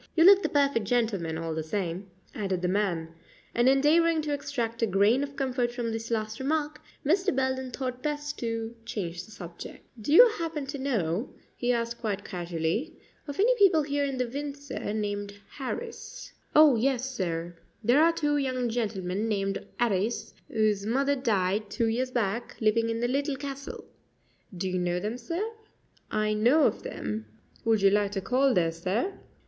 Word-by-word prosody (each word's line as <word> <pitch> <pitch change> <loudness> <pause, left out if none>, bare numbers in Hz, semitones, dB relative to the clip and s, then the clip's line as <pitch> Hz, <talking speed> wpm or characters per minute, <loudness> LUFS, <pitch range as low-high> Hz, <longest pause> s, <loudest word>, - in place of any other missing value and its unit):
"You 330 - +5
look 395 +2 +8
the - - 0
perfect 280 -7 +2
gentleman, 200 -9 0
all 165 0 -3
the 160 - -2
same," 180 +2 -3 0.3
added 190 -3 -2
the - - +2
man; 180 -4 0 0.4
and 240 +2 +4
endeavoring 315 +4 +4
to 295 -1 -1
extract 240 -5 -3
a 230 - +3
grain 205 +6 +3
of 280 0 -4
comfort 255 -3 0
from 240 -2 -3
this 225 0 -4
last 220 -1 -2
remark, 300 +2 -1 0.2
Mr. 370 +3 +2
Belden 260 -1 0
thought 255 0 -4
best 295 0 -3
to 230 0 -3
change 175 -6 -4
the - - -18
subject. 180 -5 -9 0.2
"Do 250 - -3
you 480 +11 +10
happen 320 -4 -3
to 280 +1 -5
know," 220 -6 -1 0.3
he 245 0 0
asked 235 0 -2
quite 205 -3 -2
casually, 175 - -2 0.3
"of 285 +3 -6
any 465 +5 +5
people 360 -6 +6
here 285 0 0
in 275 -2 -2
Windsor 280 0 -4
named 205 -1 -3
Harris?" 460 - -6 0.2
"Oh, 300 -3 +8
yes, 255 +2 +1
sir; 170 -4 -3 0.3
there 245 +7 +5
are 330 +1 +6
two 295 -3 0
young 255 -3 0
gentlemen 210 -3 -2
named 195 -2 -1 0.2
'Arris, 220 -1 0 0.2
whose 215 -2 +1
mother 275 +6 +1
died 210 -4 0
two 230 - 0
years 240 +3 0
back, 235 -2 -2
living 230 +1 +2
in 230 0 -2
the 240 - +2
Little 280 +2 0
Castle. 275 0 -7 0.7
Do 190 +2 -2
you 185 0 -1
know 175 0 0
them, 215 +6 -3
sir?" 335 - -2 0.6
"I 215 0 +1
know 245 +9 +4
of - - +2
them." 105 +1 -5 0.4
"Would 220 -3 +3
you 195 - +6
like 205 0 +2
to 195 - -2
call 260 +6 +2
there, 165 -2 +3
sir?" 190 - -2
235 Hz, 175 wpm, -28 LUFS, 200-280 Hz, 0.7 s, you